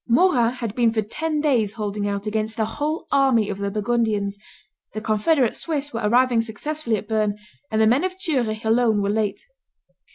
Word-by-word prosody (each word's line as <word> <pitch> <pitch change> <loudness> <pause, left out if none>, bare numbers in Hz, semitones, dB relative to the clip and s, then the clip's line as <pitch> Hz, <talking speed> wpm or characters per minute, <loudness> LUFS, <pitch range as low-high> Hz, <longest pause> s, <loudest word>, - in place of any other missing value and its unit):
Morat 245 -4 +3
had 230 -4 -4
been 235 -1 +2
for 220 -1 0
ten 305 +8 -2
days 240 -9 +1
holding 205 -2 -3
out 200 0 -3
against 215 +1 -2
the 220 - +1
whole 295 +8 -3
army 260 -6 +3
of 200 -1 -4
the 200 0 -1
Burgundians; 210 -1 0 0.6
the - - -1
confederate 225 +5 +2
Swiss 290 -4 -3
were 230 - -3
arriving 240 +2 +3
successively 230 +3 -3
at 205 - -8
Berne; 215 -2 0 0.3
and 220 - 0
the 220 - +5
men 245 +8 +3
of 370 0 -3
Zurich 235 -10 -1
alone 220 -2 +3
were 200 - +1
late. 210 -1 -2
225 Hz, 185 wpm, -23 LUFS, 215-260 Hz, 0.6 s, the